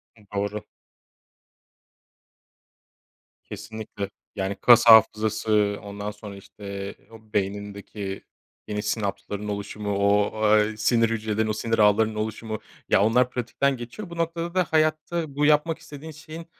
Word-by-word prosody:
Hı, 110 - -20
doğru. 100 +1 -3 2.8
Kesinlikle. 110 -2 -7 0.3
Yani 95 0 -2
kas 120 -1 +7
hafızası, 110 -2 +5
ondan 100 +1 -5
sonra, 105 -1 -10
işte, 100 0 -8 0.2
o 110 -1 -16
beynindeki 100 0 -4 0.4
yeni 105 0 -3
sinapsların 105 -1 -3
oluşumu, 100 0 -3
o, 100 +1 +3 0.3
eee, 105 +1 0
sinir 115 +1 +3
hücrelerinin 110 -1 -1
o - - +1
sinir 115 +1 -1
ağlarının 110 +1 +4
oluşumu. 110 0 -4 0.3
Ya, - - +4
onlar 125 +4 +3
pratikten 125 +3 -1
geçiyor. 125 - -8
Bu 170 - -9
noktada 170 +1 -2
da 185 - +4
hayatta 155 -1 0
bu 145 +1 +2
yapmak 150 +2 +3
istediğin 150 +2 -10
şeyin, 160 +2 -10
110 Hz, 125 wpm, -25 LUFS, 105-125 Hz, 2.8 s, kas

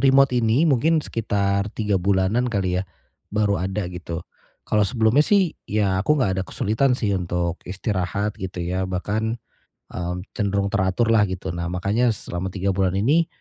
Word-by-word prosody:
remote 135 0 +5
ini, 120 +4 +3
mungkin 155 +2 +3
sekitar 100 -2 0
3 105 -3 -1
bulanan 100 +6 +2
kali 95 -5 0
ya. 95 - -7 0.4
Baru 105 -3 +1
ada, 95 +2 -2
gitu. 85 -1 -6 0.4
Kalau 105 - +1
sebelumnya 115 +2 +3
sih, 190 +1 +3 0.2
ya 100 -3 +1
aku 150 +10 +2
enggak 95 -9 +1
ada - - -1
kesulitan 125 +5 +1
sih 105 -5 0
untuk 90 -2 -1
istirahat, 100 +1 -2
gitu 90 -2 -4
ya. 90 +2 -2
Bahkan 105 +5 -1 0.5
m 90 0 -3
cenderung 100 -1 -1
teratur 95 +4 +1
lah, 110 -2 +5
gitu. 95 0 -4
Nah 85 0 -3
makanya 100 +7 +1
selama 95 -1 -5
3 100 0 0
bulan 95 -1 +1
ini, 145 +12 +3
100 Hz, 160 wpm, -23 LUFS, 95-115 Hz, 0.5 s, remote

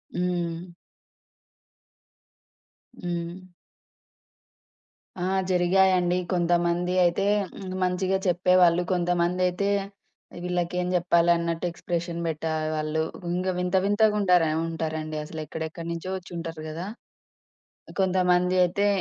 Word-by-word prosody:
హ్మ్. 175 -1 -2 2.4
హ్మ్. 175 +1 -4 1.7
ఆ! 180 0 -2 0.2
జరిగాయండి. 180 0 +3 0.2
కొంతమంది 175 0 +1
అయితే 175 +3 +2 0.3
హ్మ్. 185 -1 -7
మంచిగా 185 +1 +1
చెప్పేవాళ్ళు. 180 -1 +4
కొంతమందయితే 180 +2 +1 0.7
వీళ్ళకేం 180 0 -1
జెప్పాలి 170 -1 +3
అన్నట్టు 170 0 -2
ఎక్స్‌ప్రెషన్ 170 0 -3
బెట్టే 160 0 -2 0.2
వాళ్ళు. 155 +1 -1 0.3
ఇంగ 180 +2 -1
వింత, 180 +1 0
వింతగా 210 +1 +3
ఉండార 180 -4 +4 0.2
ఉంటారండి. 155 -1 -3
అసలెక్కడెక్కడి 160 +1 -6
నుంచో 170 +2 -5
ఒచ్చుంటారు 165 -3 -7
గదా! 165 +4 -5 1.1
కొంతమంది 180 -1 +2
అయితే 200 +3 +1
175 Hz, 85 wpm, -26 LUFS, 170-180 Hz, 2.4 s, చెప్పేవాళ్ళు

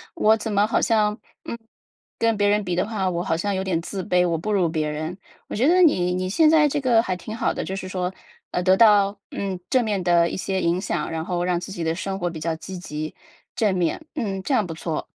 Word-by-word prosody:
我 220 -8 +4
怎 220 0 -4
么 205 +1 +3
好 - - +1
像， 215 -1 +2 0.3
嗯， 235 - -5 0.6
跟 230 -1 +2
别 205 0 +2
人 205 0 +2
比 180 -2 -2
的 180 - +1
话， 200 -4 -1
我 175 0 -2
好 160 - 0
像 200 +2 -1
有 190 - -1
点 175 -3 -1
自 190 +2 -5
卑， 180 0 +2
我 165 -1 0
不 210 +6 -3
如 185 -4 +2
别 155 -2 -1
人。 155 +4 -4 0.3
“我 - - -5
觉 240 +5 +2
得 365 +2 +5
你 180 - +4
你 185 0 -1
现 305 - +4
在 310 -2 +5
这 290 0 -1
个 235 -4 +4
还 185 -4 -2
挺 215 +5 -7
好 - - 0
的， - - -3
就 190 - -5
是 190 -1 -5
说， 185 0 -3 0.4
呃， 180 - 0
得 185 0 +5
到 205 -2 +5
嗯， 195 -2 -3
正 255 -3 +2
面 200 -4 -1
的 170 -1 +4
一 - - -4
些 190 +1 -2
影 170 +2 +1
响， 150 - -2
然 160 -1 -3
后 175 0 -2
让 180 -1 +1
自 180 - -8
己 175 -3 -4
的 160 +1 0
生 195 0 -4
活 175 0 -1
比 160 -2 -7
较 165 +1 -1
积 190 +2 -8
极、 155 -3 -6 0.4
正 210 -4 +2
面。 175 - -1
嗯， 195 -8 -3
这 280 - -1
样 215 -6 +3
不 165 - -5
错。 160 -1 -4
190 Hz, 275 characters per minute, -23 LUFS, 175-215 Hz, 0.6 s, 得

